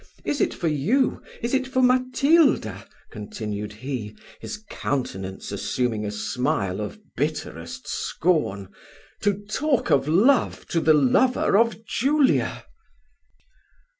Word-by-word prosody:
Is 290 - -1
it - - +2
for 170 - -3
you 180 - +1 0.2
is 235 - -1
it 260 -1 +1
for 260 0 -1
Matilda," 255 - +3 0.2
continued 105 0 -5
he, 110 -1 -6 0.2
his 215 - -7
countenance 95 - -4
assuming 115 -4 -1
a - - -3
smile 105 -2 -1
of 105 - -5 0.2
bitterest 140 - -4
scorn, 150 - -1 0.5
"to 205 0 0
talk 270 +5 0
of 140 0 +3
love 225 - +3
to 165 - +1
the 155 -1 +5
lover 150 - +3
of 225 +1 +2
Julia?" 275 +5 +1
155 Hz, 115 wpm, -24 LUFS, -, 0.5 s, the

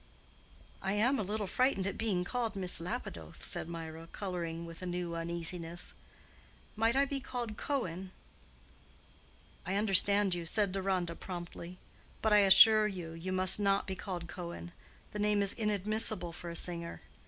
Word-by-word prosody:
"I 190 0 -1
am 245 +7 +2
a - - +1
little 210 +1 -3
frightened 250 -2 +1
at 200 - -2
being 200 -6 -1
called 230 +2 -3
Miss 185 -2 0
Lapidoth," 125 - -6
said 160 - 0
Mirah, 165 -1 -7
coloring 170 -4 -5
with 165 +1 -11
a 185 - -5
new 175 -1 -3
uneasiness. 170 0 -3 0.8
"Might 225 +2 +2
I 275 +1 +4
be 275 0 -3
called 245 -4 -5
Cohen?" 190 - -3 1.5
"I 190 - -3
understand 200 -1 +4
you," 175 -1 -3
said 205 +1 +1
Deronda, 185 -3 -1
promptly. 175 0 -8 0.5
"But 220 -1 +3
I 210 - +7
assure 215 +2 +8
you, 180 -5 -6
you 165 +3 -6
must 185 +1 +6
not 200 -1 +1
be 190 - -4
called 180 -2 -6
Cohen. 175 -1 -8 0.4
The 210 - -6
name 210 -1 +2
is 200 - 0
inadmissible 210 -4 +1
for 175 +1 -8
a 170 - -7
singer. 170 -1 0
190 Hz, 155 wpm, -32 LUFS, 170-210 Hz, 1.5 s, assure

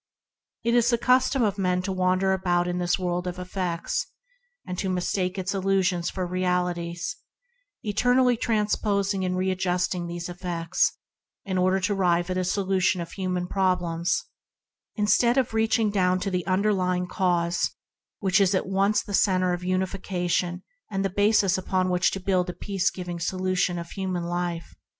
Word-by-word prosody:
It 235 +1 +1
is 240 -1 +4
the 235 - +3
custom 255 +2 +3
of 205 -2 0
men 180 -1 +1
to 195 - -2
wander 185 +1 +2
about 175 -2 +1
in 180 0 -2
this 175 0 +1
world 180 -1 -2
of 180 0 -4
effects, 180 -2 -2 0.6
mistaking 185 0 -1
its 190 +1 -2
illusions 190 -3 +1
for 185 -1 -3
realities 180 +3 -1 0.7
and 215 - -3
eternally 245 +3 +3
transposing 210 -3 0
and 185 0 -1
readjusting 180 -1 0
these 170 0 -5
effects 175 -2 -1 0.5
in 190 -2 -1
order 185 +1 +3
to 185 +2 +1
arrive 175 -2 +1
at 185 - -1
a - - 0
solution 190 0 +1
of 170 - -5
human 185 -2 -2
problems, 180 -3 0 0.7
instead 235 +4 +3
of 255 -3 +1
reaching 220 -1 +2
down 185 -2 +2
to 195 - -2
the 180 -1 -2
underlying 185 -2 +1
cause 175 -2 0 0.5
which 190 -2 +2
is 195 0 +3
at 185 - 0
once 195 +2 +1
the 200 - -8
centre 185 -2 +3
of 175 - -3
unifica 185 0 -2
tion 175 +1 0 0.3
and 195 -2 -1
the 195 - -1
basis 205 -1 +3
upon 185 0 0
which 180 0 +3
to 195 - -4
build 185 -1 0
a - - -3
peace 195 0 -1
giving 180 -2 -6
solution 185 0 0
of 170 0 -7
human 185 -3 -3
life. 175 -1 -3
185 Hz, 160 wpm, -26 LUFS, 180-195 Hz, 0.7 s, is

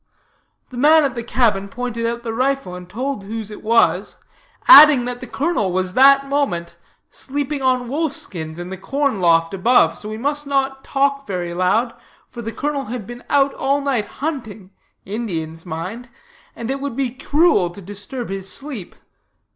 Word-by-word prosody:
The 250 - -8
man 305 +4 +5
at 275 -3 0
the 240 - -4
cabin 215 -5 +1
pointed 235 +1 -3
out 235 0 -4
the 225 -2 -4
rifle, 265 -4 -1
and 180 0 -9
told 250 +2 -4
whose 220 0 -6
it 210 - -9
was, 210 -5 +2 0.5
adding 300 - +9
that 245 0 -4
the 255 - -8
colonel 280 - -1
was 185 0 -1
that 275 +2 +6
moment 275 -13 -1 0.4
sleeping 285 +1 -4
on 255 -2 +1
wolf 300 +3 -1
skins 160 -3 -4
in 175 +1 -6
the 190 -1 -7
corn 275 0 -1
loft 165 0 +3
above, 185 -5 +3
so 210 - -7
we 215 - -5
must 290 +4 -2
not 270 -1 -1
talk 275 0 0
very 175 -3 -3
loud, 215 +7 +1 0.4
for 240 - -7
the 225 0 -5
colonel 285 +1 -3
had 235 -3 -6
been 240 +3 -10
out 280 -1 +3
all 275 +1 0
night 265 -7 -1 0.2
hunting 220 - -5 0.3
(Indians, 170 -6 -5
mind), 185 +10 -6 0.5
and 235 +2 -4
it 275 0 -3
would 280 -4 -4
be 265 -2 -1
cruel 280 - +2
to 175 - -12
disturb 205 +5 -7
his 195 0 -5
sleep. 270 -10 -5
240 Hz, 175 wpm, -20 LUFS, 195-275 Hz, 0.5 s, adding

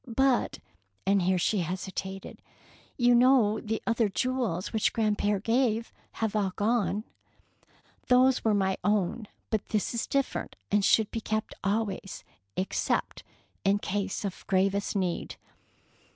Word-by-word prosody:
But," 260 +1 +2 0.5
and 195 0 +3
here 185 +1 +2
she 200 +4 +1
hesitated, 190 +2 -5 0.6
"you 245 -1 +4
know 240 -3 +5
the 220 0 -3
other 230 -2 +2
jewels 235 -5 -1
which 220 - +1
grandpere 210 -2 +1
gave 230 +1 +1 0.2
have 220 -1 -2
all 195 -3 0
gone." 215 -1 +1 1.0
"Those 255 +1 +4
were 220 -2 +3
my 190 -1 +1
own, 205 +2 0 0.2
but 220 -2 -1
this 215 0 0
is 235 - -2
different, 275 -1 -1 0.2
and 205 0 +3
should 220 +1 +3
be 225 - -3
kept 215 0 -2
always, 200 -1 -2 0.3
except 185 - -1 0.4
in 200 +1 +3
case 200 0 -2
of 195 - -5
gravest 195 +2 +1
need." 185 -3 -2
210 Hz, 130 wpm, -28 LUFS, 195-230 Hz, 1.0 s, know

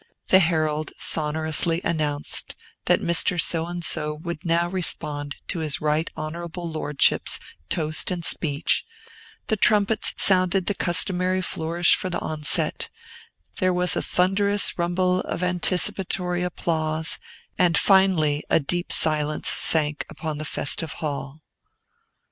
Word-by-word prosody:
The 190 - +6
herald 155 -3 -1
sonorously 160 +2 +1
announced 150 -3 -3 0.3
that - - +2
Mr. 170 +1 +1
So 165 0 +1
and 175 -1 -5
so 150 0 0
would 170 +1 -7
now 170 0 +1
respond 150 -5 0
to 175 - -2
his 155 -3 -1
Right 155 +2 -1
Honorable 170 +2 -6
Lordship's 150 -3 +1 0.3
toast 155 -2 +1
and 175 -2 -3
speech, 145 -2 +1 0.6
the 220 - 0
trumpets 210 +1 +2
sounded 185 -1 +4
the 205 - 0
customary 185 0 +2
flourish 165 +1 +1
for 185 - -4
the 175 - -3
onset, 155 -1 0 0.7
there 185 0 +2
was 180 0 +2
a - - -1
thunderous 200 +3 +1
rumble 180 +1 0
of 180 - -4
anticipatory 180 0 +1
applause, 160 -3 -2 0.4
and 175 -2 +3
finally 180 -7 +3
a - - +3
deep 175 +4 -2
silence 155 -1 0
sank 150 -2 +1
upon 155 -2 -6
the 155 - -5
festive 150 +2 0
hall. 145 0 -6
170 Hz, 125 wpm, -23 LUFS, 155-180 Hz, 0.7 s, The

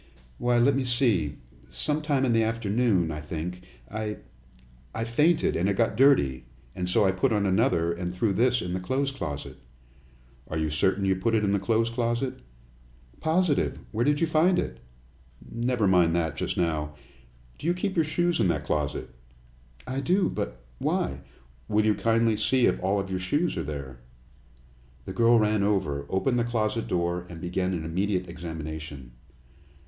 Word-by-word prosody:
"Why, 120 0 +2
let 130 +3 +4
me 135 - +1
see. 120 - +1 0.3
Some 145 - -1
time 145 -3 +1
in 120 - +2
the 115 - +4
afternoon, 110 -5 +1
I 75 0 -5
think. 85 +4 -5 0.3
I 110 - -4 0.8
I 115 - -1
fainted, 150 +8 +2
and 95 +4 +1
it 100 - +1
got 115 -2 +2
dirty, 70 - +4 0.3
and 90 -1 -3
so 100 - +3
I 95 - +4
put 95 +7 +1
on 105 -2 +1
another 85 -3 +2
and 90 +1 -4
threw 95 +3 0
this 120 +3 +2
in 90 - -4
the 95 - -1
clothes 135 +9 -1
closet." 75 - -6 0.9
"Are 80 - -3
you 80 -1 -1
certain 95 +6 +1
you 95 0 +2
put 115 +5 0
it 110 - +2
in 100 - +2
the 100 - +2
clothes 115 +3 +1
closet?" 120 +2 -1 0.8
"Positive. 160 -1 +1
Where 115 +2 0
did 145 +2 +2
you 165 - +3
find 165 +3 +3
it?" 65 -2 -2 0.7
"Never 120 -1 0
mind 90 -3 +4
that 80 -3 0
just - - -2
now. 75 -3 -1 0.6
Do - - -4
you 175 - +3
keep 190 +2 -2
your 165 - +3
shoes 175 +1 0
in 105 - +3
that 75 -4 0
closet?" 75 -3 -2 0.7
"I 130 +1 -3
do. 180 +7 +2
But - - -5
why - - -1 0.2
" - - -30
"Will 105 +1 +2
you 110 - +4
kindly 115 0 +2
see 125 +4 +3
if - - +1
all 95 +2 +1
of 95 -1 -4
your 95 - -1
shoes 145 - 0
are 85 - -2
there?" 70 -5 -6 1.1
The - - -6
girl 115 +2 +5
ran 105 -1 +2
over, 75 -9 0
opened 120 +6 +1
the - - +2
closet 115 -1 -1
door, 85 0 -1
and 85 -2 -8
began 90 +2 -1
an 80 -3 -3
immediate 90 +2 -1
examination. 80 -6 -7
100 Hz, 180 wpm, -27 LUFS, 85-120 Hz, 1.1 s, girl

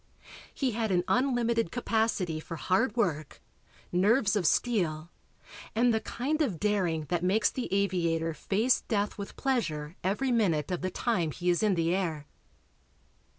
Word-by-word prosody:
"He 265 -3 -1
had 220 -1 -1
an 175 -1 +2
unlimited 235 -6 +1
capacity 220 -9 0
for 165 - -7
hard 195 +8 +1
work, 155 -9 -1 0.5
nerves 205 +4 +3
of 185 -6 +2
steel 170 -7 0 0.6
and 240 +1 +3
the 220 - +2
kind 295 +6 -2
of 210 - 0
daring 185 -7 0
that 175 -1 0
makes 205 +4 +2
the 255 - -4
aviator 170 -4 0
face 215 +10 +1
death 205 -1 -1
with 200 - -7
pleasure 165 - -1
every 210 +8 0
minute 185 -10 +1
of 180 - -2
the 185 - -1
time 185 -7 0
he 175 +4 0
is 175 - 0
in 210 -3 +2
the 165 0 +1
air." 165 -6 -2
195 Hz, 150 wpm, -29 LUFS, 170-230 Hz, 0.6 s, nerves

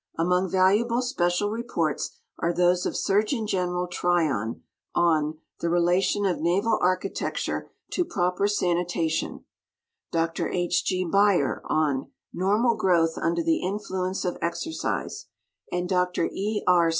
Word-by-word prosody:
— - - -32
Among 180 +3 +2
valuable 210 +7 +3
special 205 -4 0
reports 215 -9 -2 0.2
are 170 - +1
those 175 +1 +2
of - - -3
Surg. 205 +2 +2 0.2
Gen. 180 -3 -1
Tryon, 155 -12 0 0.3
on 155 -2 +2 0.2
"The 170 - -1
Relation 175 +4 +2
of 180 -4 0
Naval 195 +7 +2
Architecture 185 +1 -1 0.2
to 360 - +1
projjer 190 - 0
Sanitation; 175 -4 -1 0.7
Dr 165 0 0
H. 175 -1 0
G. 185 0 0
Beyer, 195 -5 +2
on 145 -4 0 0.2
"Normal 215 +6 +2
Growth 170 -6 +2
under 170 0 0
the 165 0 +1
Influence 190 -1 -2
of 180 - -2
Exercise," 170 - -3 0.4
and 180 0 -1
Dr 180 -2 +1
E. 210 +2 -2
K. 175 -2 +5
180 Hz, 125 wpm, -26 LUFS, 170-195 Hz, 0.7 s, K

